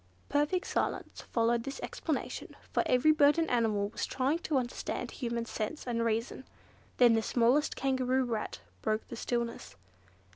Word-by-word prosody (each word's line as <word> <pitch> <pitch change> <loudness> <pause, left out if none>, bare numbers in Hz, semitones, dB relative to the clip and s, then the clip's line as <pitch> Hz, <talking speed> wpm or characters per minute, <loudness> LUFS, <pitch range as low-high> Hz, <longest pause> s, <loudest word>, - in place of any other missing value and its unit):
Perfect 295 +6 +1
silence - - -2
followed 230 0 +2
this 275 +2 -5
explanation, - - -4 0.2
for - - +2
every 255 +5 +5
bird 295 0 +5
and 330 -1 +2
animal 215 -4 +2
was - - -3
trying 270 +5 0
to 310 -4 0
understand 245 -1 -3
human 235 -3 -3
sense 230 +7 -4
and 235 -2 0
reason. 230 +3 -1 0.5
Then 240 -2 +7
the 225 - +3
smallest 245 +6 +2
Kangaroo 260 -1 +1
Rat 220 - -3 0.2
broke 215 0 -1
the - - -5
stillness. 235 - -3
245 Hz, 150 wpm, -31 LUFS, 230-275 Hz, 0.5 s, Then